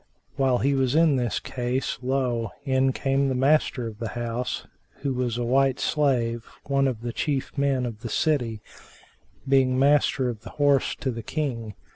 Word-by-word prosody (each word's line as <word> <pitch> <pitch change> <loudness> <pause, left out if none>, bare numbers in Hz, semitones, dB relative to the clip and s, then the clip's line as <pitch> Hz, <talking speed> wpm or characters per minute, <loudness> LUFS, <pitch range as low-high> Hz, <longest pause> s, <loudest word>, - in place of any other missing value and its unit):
While 135 -2 +2
he 140 +3 +1
was 135 0 +1
in 160 -3 +5
this 120 -2 -1
case, 125 +1 -3
lo! 125 -3 0 0.2
in 130 -1 +2
came 135 +1 0
the 130 - 0
master 135 -2 +2
of 110 -2 -7
the 115 - -3
house, 120 +1 -3 0.4
who 140 -1 -1
was 125 -2 -1
a 120 - -1
white 135 +2 +2
slave, 120 -6 +1 0.2
one 140 -1 +1
of 120 -4 -3
the 120 -1 -4
chief 140 -4 -2
men 140 -3 +1
of 110 -3 -6
the 115 - -5
city, 120 -9 0 0.8
being 130 -1 +3
Master 140 -1 +3
of 115 -3 -4
the - - -11
Horse[FN#388] 145 -2 +3
to 130 - 0
the 115 -1 -5
King. 115 -7 -3
130 Hz, 175 wpm, -25 LUFS, 120-140 Hz, 0.8 s, in